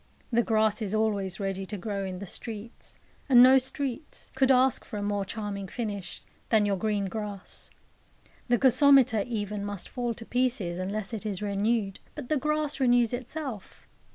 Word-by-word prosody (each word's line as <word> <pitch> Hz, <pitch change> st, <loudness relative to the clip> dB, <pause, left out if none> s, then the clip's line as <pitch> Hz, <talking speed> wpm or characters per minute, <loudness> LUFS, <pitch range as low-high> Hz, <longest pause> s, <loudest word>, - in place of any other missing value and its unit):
The 235 Hz, 0 st, +4 dB
grass 220 Hz, -1 st, +2 dB
is 210 Hz, 0 st, -1 dB
always 205 Hz, -3 st, 0 dB
ready 195 Hz, -1 st, -2 dB
to 210 Hz, -, -5 dB
grow 200 Hz, 0 st, -3 dB
in 185 Hz, -1 st, -5 dB
the 200 Hz, -, -6 dB
streets 220 Hz, +3 st, -7 dB, 0.3 s
and 245 Hz, -2 st, +9 dB
no 260 Hz, +1 st, +8 dB
streets 265 Hz, +2 st, -5 dB
could 265 Hz, 0 st, +2 dB
ask 260 Hz, -1 st, +4 dB
for 210 Hz, -, -7 dB
a 205 Hz, -, -3 dB
more 205 Hz, -1 st, 0 dB
charming 200 Hz, -2 st, -5 dB
finish 205 Hz, -3 st, -5 dB, 0.3 s
than 215 Hz, -2 st, +4 dB
your 200 Hz, -1 st, +1 dB
green 205 Hz, 0 st, -1 dB
grass. 205 Hz, -1 st, -6 dB, 0.8 s
The 245 Hz, -1 st, +3 dB
gasometer 260 Hz, -4 st, +5 dB
even 210 Hz, -3 st, -3 dB
must 205 Hz, -2 st, -4 dB
fall 240 Hz, -2 st, -2 dB
to 230 Hz, -, -10 dB
pieces 235 Hz, -9 st, -1 dB
unless 200 Hz, +3 st, -3 dB
it 220 Hz, -, -4 dB
is 210 Hz, -2 st, -3 dB
renewed; 205 Hz, 0 st, 0 dB, 0.2 s
but 285 Hz, -5 st, -7 dB
the 305 Hz, -, +2 dB
grass 300 Hz, +1 st, -1 dB
renews 245 Hz, -2 st, +3 dB
itself. 255 Hz, -3 st, -6 dB
220 Hz, 170 wpm, -28 LUFS, 200-250 Hz, 0.8 s, and